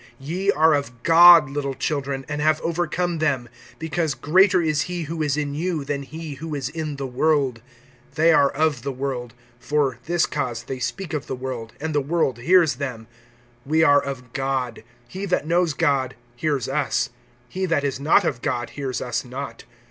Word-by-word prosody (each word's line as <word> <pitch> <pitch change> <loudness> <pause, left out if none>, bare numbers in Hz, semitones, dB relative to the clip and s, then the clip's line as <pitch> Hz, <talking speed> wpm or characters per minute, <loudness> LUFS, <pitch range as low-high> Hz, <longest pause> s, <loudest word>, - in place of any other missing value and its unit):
(4)Ye 175 +8 -3
are 160 +1 +5
of 125 -5 -3
God, 170 -2 +8
little 140 -1 -3
children, 140 -2 -2
and 150 -1 -3
have 155 0 +3
overcome 170 0 -1
them; 135 -6 0 0.3
because 160 -2 -2
greater 185 +4 +4
is 155 -3 +1
he 175 -1 -3
who 160 +1 -4
is 150 -1 0
in 145 -1 -2
you, 160 -1 -2
than 140 0 -2
he 155 +2 -7
who 160 -2 -4
is 135 -2 -3
in 155 -1 -4
the 140 0 -4
world. 135 -2 +1 0.5
(5)They 165 +1 +5
are 140 -1 +5
of 150 -3 0
the 140 +3 -3
world; 125 -3 -4 0.2
for 140 -3 0
this 175 0 +2
cause 120 -5 -3
they 130 +1 -6
speak 180 +7 -4
of 150 -2 -3
the - - -3
world, 125 -3 -6
and 155 +1 -3
the 145 - +2
world 140 -4 0
hears 165 0 +4
them. 125 -5 -5 0.6
(6)We 160 +1 +4
are 145 0 +6
of 125 -3 -7
God; 130 -4 -2 0.2
he 190 +8 -5
that 180 - 0
knows 170 -1 +1
God, 140 -6 +1 0.2
hears 145 +1 -1
us; 140 -1 0 0.4
he 190 +8 -3
that 165 -4 +1
is 135 -2 -2
not 160 +7 +4
of 130 -7 -2
God, 120 0 -2
hears 135 -3 -4
us 120 -2 -2
not. 125 -2 -7
145 Hz, 185 wpm, -23 LUFS, 135-160 Hz, 0.6 s, God